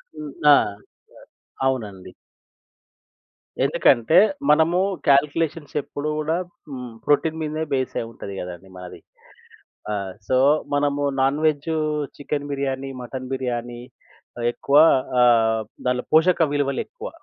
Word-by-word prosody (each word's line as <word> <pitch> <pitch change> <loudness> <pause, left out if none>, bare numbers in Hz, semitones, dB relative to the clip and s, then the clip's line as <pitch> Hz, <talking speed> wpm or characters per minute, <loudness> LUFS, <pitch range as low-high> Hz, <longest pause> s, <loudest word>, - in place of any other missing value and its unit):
హ్మ్. 150 -2 -8 0.2
ఆ! - - +9 1.1
అవునండి. 105 -8 -3 1.5
ఎందుకంటే 120 +9 +3 0.3
మనము 160 +4 +4 0.3
కాలిక్యులేషన్స్ 145 +2 +1
ఎప్పుడు 145 +2 -5
గూడా 155 +2 -1 0.3
హ్మ్. 125 -2 -7
ప్రోటీన్ 160 +2 +1
మీదనే 155 0 -2
బేస్ 130 -1 -1
అయుంటది 115 -3 -8
గదండీ 90 +1 -9
మనది. 90 -1 -10 0.9
ఆహ్, 100 -2 -4
సో 130 - +2 0.4
మనము 145 0 0 0.2
నాన్‌వేజు 150 +3 +1 0.4
చికెన్ 145 0 -4
బిర్యానీ, 135 -1 -3
మటన్ 130 +1 -7
బిర్యానీ 120 -2 -4 0.6
ఆహ్, 120 - -1
ఎక్కువ 140 +3 +1 0.4
ఆహ్, 115 -2 +4 0.3
దాంట్లో 125 0 0
పోషక 160 -1 +4
విలువలు 140 -2 0
ఎక్కువ. - - -8
140 Hz, 105 wpm, -22 LUFS, 120-150 Hz, 1.5 s, ఆ